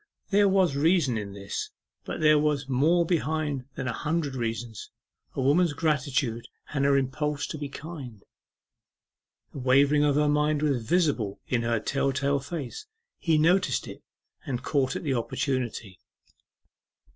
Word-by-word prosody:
There 200 0 +5
was 190 -6 +3
reason 155 -3 +3
in 100 -2 -4
this. 100 0 -5 0.4
But - - -5
there 155 -1 +6
was 145 -2 0
more 155 +7 +3
behind 155 -5 -1
than 130 - -4
a 125 - -1
hundred 155 -1 -2
reasons 115 -3 -4 0.5
a - - -1
woman's 155 +4 +3
gratitude 140 -6 -1 0.3
and 140 -2 +1
her 140 0 +4
impulse 145 +2 -1
to - - -6
be 145 -1 -4
kind. 140 - -9 1.3
The - - -7
wavering 140 +3 +4
of 145 -1 +3
her 150 0 +3
mind 150 0 +1
was 135 -6 +1
visible 140 - +1
in 120 -2 0
her 115 -1 0
tell 135 +5 0
tale 140 +1 0
face. 145 - -6 0.3
He 160 -2 +2
noticed 180 +5 +2
it, - - -9 0.4
and 125 -3 -4
caught 135 -3 0
at - - -4
the 140 -4 0
opportunity. 120 -5 -2
140 Hz, 150 wpm, -27 LUFS, 130-155 Hz, 1.3 s, there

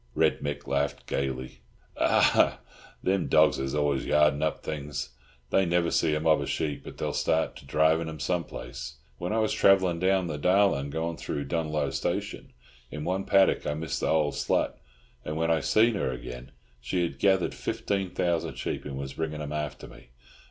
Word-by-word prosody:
Red - - +2
Mick 70 0 -4
laughed 70 +1 -1
gaily. 65 -1 -3 0.3
"Ah, - - +3 0.5
thim 95 -1 +1
dogs - - +4
is 65 +1 -2
always 75 -2 +1
yardin' 75 -1 +3
up 80 0 -1
things. 75 -2 -4 0.4
They 95 - +4
never 85 -1 +1
see 80 -2 +2
a - - 0
mob 80 0 +3
of - - -3
sheep, 75 -2 -2
but - - -10
they'll - - -2
start 80 0 0
to 70 - -14
dhrive 80 +3 +3
'em 80 -1 -8
some 85 +4 -1
place. 65 +4 -8 0.2
When 90 +2 -3
I 110 - +1
was 110 -1 +1
travellin' 95 -3 +4
down 95 0 +2
the 75 -4 -4
Darlin', 90 -5 +3
goin' 80 +2 -3
through 70 - -3
Dunloe 75 -4 -1
Station, - - -3 0.4
in 75 - -6
one 95 +3 -1
paddock 95 -1 +3
I 75 - -1
missed 80 -1 -3
th' - - -7
old 75 -2 +2
slut, - - 0 0.5
and 75 0 -4
when 80 +1 +1
I 80 - +3
see 110 +8 +3
her 100 - -1
again, 60 0 -8 0.3
she 90 +9 -1
had 85 - -4
gethered 95 -2 +2
fifteen 95 -2 -2
thousand 85 -1 -1
sheep, - - -4
and 70 -2 -5
was 70 0 -5
bringin' 80 -1 -3
'em 75 -1 -5
after 75 -2 -4
me. - - -15
80 Hz, 185 wpm, -28 LUFS, 70-90 Hz, 0.5 s, dogs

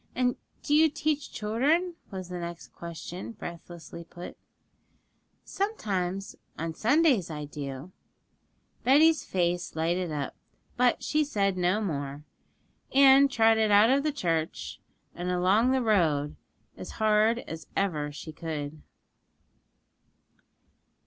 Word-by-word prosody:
'And 250 0 +1 0.3
do 290 - 0
you 315 +1 +6
teach 300 0 -2
children?' 285 +12 0 0.2
was 185 -2 -6
the 180 -1 -5
next 170 0 -7
question, 170 +5 -7
breathlessly 170 -3 -9
put. 175 +1 -10 1.1
'Sometimes; 195 - -3 0.2
on 165 0 -3
Sundays 250 - +3
I 150 -2 -5
do.' 140 +2 -7 0.9
Betty's 310 +5 +5
face 175 -2 -1
lighted 170 +2 -1
up, 145 -2 -4 0.4
but 245 -1 +2
she 305 0 +1
said 200 -9 0
no 180 +4 +1
more, 145 -6 -4 0.7
and 275 0 +7
trotted 225 -3 +3
out 210 +3 +6
of 275 +1 +3
the 305 +1 0
church 160 - -3 0.3
and 175 +1 -4
along 185 +7 +3
the 260 -1 +2
road 160 -10 +2 0.4
as - - -9
hard 215 +1 +3
as 165 0 -8
ever 155 -7 0
she 155 +2 -8
could. 155 -2 -6
185 Hz, 115 wpm, -28 LUFS, 165-250 Hz, 1.1 s, and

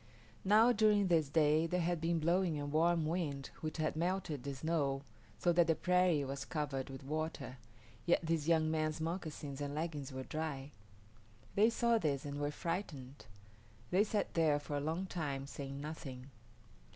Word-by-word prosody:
Now 215 +5 +6
during 210 -3 +4
this 160 -5 +3
day 155 +1 +3
there 180 +2 0
had 170 -1 0
been 165 +1 +1
blowing 170 0 +1
a 145 - -3
warm 160 +2 +2
wind 155 -5 -2
which 155 0 -3
had 155 -1 0
melted 170 -4 -1
the 140 +1 -4
snow, 140 -2 0 0.3
so 175 +9 +2
that 170 -1 +4
the 165 - +3
prairie 180 -5 +3
was 135 +1 -4
covered 145 -4 -3
with 135 0 -8
water, 155 -2 -3 0.5
yet 170 - +4
this 160 -2 0
young 160 -2 +3
man's 155 -1 0
moccasins 160 -4 -4
and 145 0 -3
leggings 150 -3 -3
were 130 0 -5
dry. 150 -2 -4 0.8
They 215 +3 +5
saw 235 0 +2
this, 145 -5 -1
and 145 0 -4
were 145 0 0
frightened. 150 - -5 0.6
They 190 +3 +5
sat 210 -1 -1
there 160 -3 +3
for 145 0 -5
a - - +1
long 160 +6 -2
time, 145 -7 -3
saying 140 0 -6
nothing. 140 -3 -7
155 Hz, 170 wpm, -35 LUFS, 145-170 Hz, 0.8 s, Now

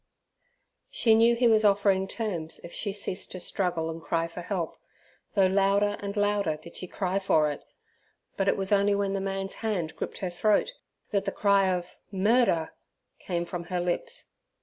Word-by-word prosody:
She 225 - +3
knew 230 +2 +5
he 240 +1 +3
was 220 -1 +5
offering 200 -2 +3
terms 180 -7 -3
if 170 - -10
she 205 - -2
ceased 195 -1 -4
to 185 - -6
struggle 175 -3 0
and 165 0 -5
cry 165 0 -1
for 170 +1 -8
help, 175 -2 -3 0.6
though 195 -2 +5
louder 200 +2 +2
and 200 +1 -5
louder 205 -6 +1
did 170 +2 -13
she 185 - -6
cry 190 +1 -1
for 155 -6 +2
it, 145 - -8 0.7
but 195 - -1
it - - +3
was 195 0 -1
only 200 0 +4
when 200 -1 0
the 195 - -1
man's 195 0 -3
hand 190 -8 -2
gripped - - -5
her 185 -2 -3
throat, 210 - +2 0.4
that 200 -1 0
the 195 - -1
cry 200 -2 +3
of 180 -1 -3
"Murder" 200 -4 +2 0.5
came 175 -2 -2
from 170 0 -5
her 180 0 -2
lips. 175 - -1
195 Hz, 180 wpm, -28 LUFS, 175-205 Hz, 0.7 s, knew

